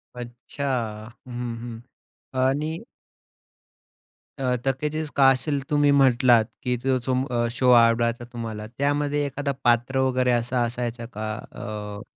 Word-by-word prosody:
अच्छा. 120 +3 -7 0.6
हं, 120 -1 -4
हं. 115 -1 -7 0.7
आणि 155 +4 -1 1.6
अ, 125 -2 +1
तकेजीस 150 +3 -1
कासल 135 +1 +3
तुम्ही 145 -1 +4
म्हंटलात, 125 -3 +5 0.2
की 125 -1 0
ज 130 +1 +1
जो 130 - +1
अ, 120 -1 0
शो 125 +1 +1
आवडायचा 115 0 +4
तुम्हाला 110 -3 -5
त्यामध्ये 145 +1 +1
एखादा 140 0 -2
पात्र 120 +2 +2
वगैरे 125 -1 +1
असा 120 +1 +1
असायचा 120 0 -3
का? 110 +1 -4 0.2
अ 105 -1 -6
125 Hz, 120 wpm, -24 LUFS, 120-140 Hz, 1.6 s, म्हंटलात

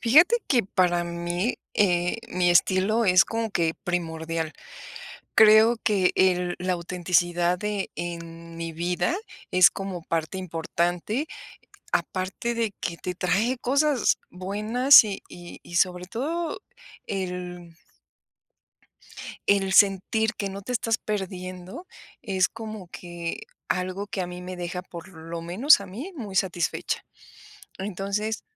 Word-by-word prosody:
Fíjate 315 - +6
que 245 -4 +4
para 175 -2 +1
mí, 175 +5 -2 0.2
eh, 180 -1 +2
mi 180 -1 +2
estilo 190 +6 +3
es 180 -3 +6
como 225 +1 -3
que 165 -3 0
primordial. 165 -2 -2 0.8
Creo 220 +2 +7
que 195 -4 +3
el 180 -1 +2
la 185 0 0
autenticidad 175 0 +1
de 210 -1 -3
en 170 -1 -7
mi 165 0 -4
vida 175 - 0 0.4
es 185 -1 +7
como 190 -3 -6
parte 165 +2 -2
importante, 175 - -2 0.7
aparte 190 +6 -1
de 230 -3 -1
que 170 - -3
te 180 +1 -5
trae 200 +8 0
cosas 275 0 +2
buenas 215 +9 +5
y 205 -2 -5
y 175 0 -11
y 175 - -7
sobre 180 0 +1
todo 310 - -3 0.5
el 180 -3 -5 1.7
el 195 -1 +3
sentir 205 +3 +3
que 200 - -3
no 195 +1 -7
te 225 - -8
estás 225 -2 0
perdiendo 185 - -5 0.4
es 190 -6 +1
como 215 -4 -8
que 175 -1 -6 0.3
algo 185 +2 -2
que 200 - -4
a 180 - -1
mí 180 0 -8
me 185 +1 -6
deja, 180 +1 -4
por 180 0 -10
lo 165 -1 -7
menos 200 - +5
a 200 - -7
mí 245 - -7
muy 210 - -7
satisfecha. 175 -3 -1 0.7
Entonces, 200 +3 -3
185 Hz, 130 wpm, -25 LUFS, 175-215 Hz, 1.7 s, Creo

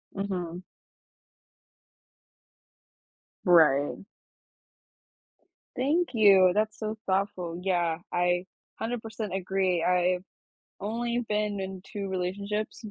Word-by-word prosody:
Mhm. 180 -3 -3 2.8
Right. 155 -5 +5 1.8
Thank 300 +7 +1
you, 195 -5 +6
that's 215 +1 0
so 215 0 -3
thoughtful. 185 -3 -1
Yeah, 175 -4 +1
I 175 +1 +1 0.3
100% 225 -3 -4
agree, 190 -2 0
I've 180 0 +2 0.6
only 235 +3 -1
been 210 -1 0
in 190 -1 -5
2 200 -1 -5
relationships 200 +5 -3
190 Hz, 80 wpm, -28 LUFS, 180-215 Hz, 2.8 s, you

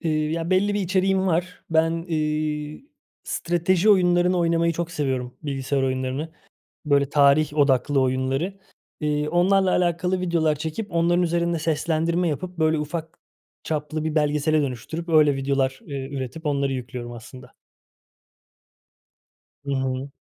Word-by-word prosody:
Eee, 155 -2 0
ya, 165 +1 -3
belli 200 +2 +2
bir 205 - 0
içeriğim 190 +1 +1
var. 180 +1 -1
Ben, 165 +1 +1
iii, 155 - -2 0.4
strateji 175 +4 +1
oyunlarını 180 -1 +3
oynamayı 170 0 +2
çok 170 +1 -3
seviyorum, 130 -6 -2
bilgisayar 135 -1 -2
oyunlarını. 130 +4 -2 0.5
Böyle 140 -1 +3
tarih 145 +1 +4
odaklı 140 0 +3
oyunları. 135 +9 -1 0.4
Eee, 150 -1 0
onlarla 190 +2 +3
alakalı 180 +1 +1
videolar 165 -4 +1
çekip, 160 +6 -5
onların 170 +1 +2
üzerinde 170 0 0
seslendirme 165 +2 0
yapıp, 180 +4 -4
böyle, 160 0 +2
ufak 160 +2 -5 0.5
çaplı 155 0 -3
bir 160 - -2
belgesele 150 0 +2
dönüştürüp, 140 +6 -5
öyle 155 -3 +4
videolar, 135 -1 0
eee, 135 -2 -5
üretip 140 +4 -5
onları 140 -1 0
yüklüyorum 125 -1 -6
aslında. 125 +2 -12 2.1
Hı 140 - -3
hı. 130 0 -2
155 Hz, 130 wpm, -24 LUFS, 140-170 Hz, 2.1 s, tarih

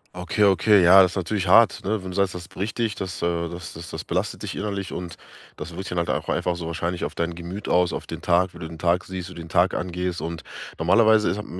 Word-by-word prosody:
Okay, 90 +3 0
okay, 100 0 +5
ja, 95 +3 +9
das 90 -1 +3
ist - - -9
natürlich 95 +1 -2
hart, 110 +3 +5
ne? 105 0 -1
Wenn 95 - -6
du - - -8
sagst, 100 -2 +1
das 85 -2 -8
bricht 105 +3 -5
dich 115 -3 0
das, 95 -1 -5
äh, 85 0 0
das 85 0 -8
das 85 +1 -9
das - - -5
belastet - - -3
dich - - -5
innerlich 100 -2 -3
und 90 -2 -6 0.4
das 75 - -7
wirkt 90 +3 -7
sich - - -4
dann 85 -1 +1
halt - - -2
einfach 90 -1 0
so 85 -2 -5
wahrscheinlich 85 +1 -2
auf - - -6
dein 85 0 -2
Gemüt 90 +4 -7
aus, 90 0 +3
auf - - -5
den - - -7
Tag, 90 +1 +2
wie 85 - -12
du 80 - -6
den 80 0 -10
Tag 85 +3 +1
siehst, 95 -1 -6
wie 90 - -11
den 85 -1 -8
Tag 90 +3 +2
angehst. 90 0 -3
Und 85 0 -5 0.3
normalerweise 110 +5 +4
ist 95 - -1
hat 105 - -6
90 Hz, 265 wpm, -24 LUFS, 85-95 Hz, 0.4 s, ja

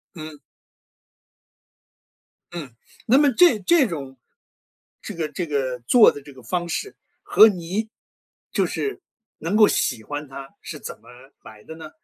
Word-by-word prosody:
嗯。 155 -2 -9 2.1
嗯， 150 -9 -8 0.3
那 255 +4 +5
么 290 -2 +4
这 250 -3 +4
这 280 - +3
种 135 -6 -7 0.8
这 - - -7
个 160 -2 -3
这 170 +4 -4
个 135 -5 -2
做 245 -3 +7
的 145 - -10
这 140 0 -14
个 130 - -15
方 175 +8 -3
式， 410 - -4 0.3
和 220 - +7
你 195 +3 -3 0.6
就 - - +1
是 410 -2 -4 0.4
能 170 +6 -2
够 215 -1 +7
喜 110 - -1
欢 145 +4 -6
它 135 0 -10
是 150 - -8
怎 - - -9
么 - - -19 0.3
来 110 -1 -14
的 160 - -10
呢？ 160 -1 -10
165 Hz, 160 characters per minute, -22 LUFS, 140-215 Hz, 2.1 s, 做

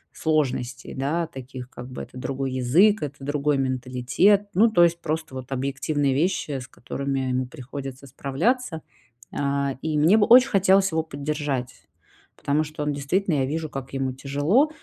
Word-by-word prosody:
сложностей, 135 -5 -1
да, 150 +6 -1
таких, 130 -4 -9
как 125 +1 -9
бы, 130 - -6
это 125 - -11
другой 135 0 -3
язык, 170 - +4
это 145 -1 -4
другой 145 0 +1
менталитет, 130 +10 +2
ну, 220 +5 +5
то 175 -5 +5
есть 170 0 +2
просто 155 -2 -3
вот 130 0 -8
объективные 140 +1 0
вещи, 150 -3 0
с 125 - -9
которыми 135 +2 -4
ему 130 0 -1
приходится 135 0 -8
справляться. 160 - -1 0.5
А, 140 -1 0
и 155 -1 -1
мне 165 +9 +5
бы 205 - +3
очень 255 +2 +8
хотелось 195 -2 +4
его 160 0 +1
поддержать, 145 -4 -4 0.5
потому 150 +2 0
что 150 -1 -6
он 150 -1 -1
действительно, 160 +5 0
я 130 - +2
вижу, 155 +1 -3
как 135 0 -7
ему 135 -1 -1
тяжело, 145 - +2
140 Hz, 160 wpm, -24 LUFS, 130-160 Hz, 0.5 s, очень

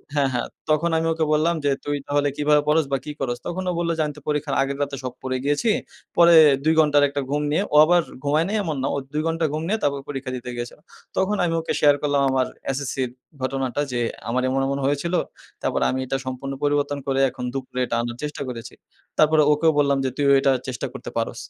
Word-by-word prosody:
হ্যাঁ, 140 -2 +2
হ্যাঁ। 125 - -1 0.2
তখন 155 +3 +2
আমি 165 0 0
ওকে 160 0 0
বললাম 160 +3 +2
যে, 140 - +3
"তুই 145 0 -1
তাহলে 145 0 +1
কিভাবে 150 0 +3
পড়স 155 0 +3
বা 135 - +2
কি 150 - -4
করস?" 120 -3 -2
তখন 185 +2 -3
ও - - +1
বললো 170 -1 0
যে, 160 - +1
"আমি 150 - -4
তো - - -11
পরীক্ষার 150 -1 -1
আগের 135 0 -1
রাতে 140 -1 -1
সব 125 - -4
পড়ে 130 0 -1
গিয়েছি। 145 +11 +1 0.5
পরে 170 0 +7 0.3
২ 160 +2 +3
ঘন্টার 150 -2 +5
একটা 140 0 -2
ঘুম 145 +1 0
নিয়ে;" 160 - +2
ও - - +2
আবার 175 +1 +4 0.2
ঘুমায় 150 +3 +2
নাই, 205 - -2
এমন 160 -5 -2
না। - - +1
ও - - -1 0.2
২ 150 - 0
ঘন্টা 165 0 0
ঘুম 155 - -2
নিয়ে, 220 - +1
তারপর 140 -1 +1
পরীক্ষা 135 -2 -4
দিতে 125 0 -7
গিয়েছিল। 120 +4 -6 0.4
তখন 190 +2 +2
আমি 165 - 0
ওকে 165 - -2
শেয়ার 145 -1 +5
করলাম 145 -1 +1
আমার 130 -1 +1 0.2
এসএসসি'র 130 -2 -2 0.3
ঘটনাটা 135 +1 -1
যে, 125 - -1 0.3
"আমার 125 +2 +1
এমন, 135 +1 +1
এমন 140 - -1
হয়েছিল। 145 +5 -1 0.5
তারপর - - -1
আমি 130 - -1
এটা 135 - -1
সম্পূর্ণ 130 +1 -4
পরিবর্তন 145 0 +1
করে, 135 0 +1
এখন 125 0 -8
দুপুরে 130 -1 -5
এটা 120 - -2
আনার 120 0 -5
চেষ্টা 150 -1 -4
করেছি।" 115 -2 -7 0.4
তারপর 155 +1 +4 0.2
ওকেও 160 +2 +3
বললাম 140 -1 +3
যে, 130 - +1
"তুইও 140 -1 +3
এটা 135 0 +3 0.2
চেষ্টা 125 -2 -3
করতে - - -7
পারোস।" - - -1
145 Hz, 225 wpm, -23 LUFS, 135-155 Hz, 0.5 s, পরে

